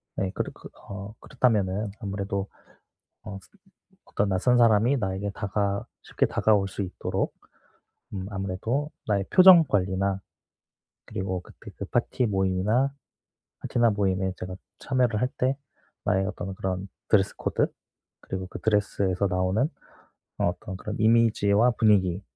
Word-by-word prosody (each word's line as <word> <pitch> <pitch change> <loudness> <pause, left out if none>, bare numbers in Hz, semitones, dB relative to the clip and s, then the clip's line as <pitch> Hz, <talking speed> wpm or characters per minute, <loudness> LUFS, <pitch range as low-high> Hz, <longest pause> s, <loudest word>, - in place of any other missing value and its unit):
네. 95 -1 -1
그렇 - - -3
그 - - -12 0.2
어 100 +1 -7
그렇다면은 105 -5 0
아무래도 100 -2 -3 0.8
어 100 - -7
아까 95 - -12 0.6
어떤 100 - -1
낯선 100 +6 +3
사람이 115 +3 +5
나에게 95 -1 -2
다가 100 0 -1 0.2
쉽게 - - 0
다가올 100 -3 +2
수 100 - -4
있도록 95 -1 -2 0.8
음 95 -2 -4
아무래도 100 +9 -2 0.2
나의 100 -2 +1
표정 185 -2 +9
관리나 95 -3 0 0.9
그리고 95 -1 -3
그때 - - -13
그 - - -5
파티 125 - 0
모임이나 100 +6 +1 0.7
파티나 120 -2 +2
모임에 95 -2 0
제가 90 0 -6 0.2
참여를 125 -5 +1
할 125 - +3
때 130 +2 +1 0.5
나의 95 0 +1
어떤 95 -1 -5
그런 95 0 -3 0.2
드레스 100 -1 +3
코드 - - 0 0.5
그리고 95 -1 -5
그 - - -8
드레스에서 100 -2 +1
나오는 95 +9 +1 0.7
어 - - +2
어떤 90 +2 -5
그런 105 +3 -6
'이미지와 110 0 +4
분위기 100 -5 +2
100 Hz, 295 characters per minute, -26 LUFS, 95-110 Hz, 0.9 s, 표정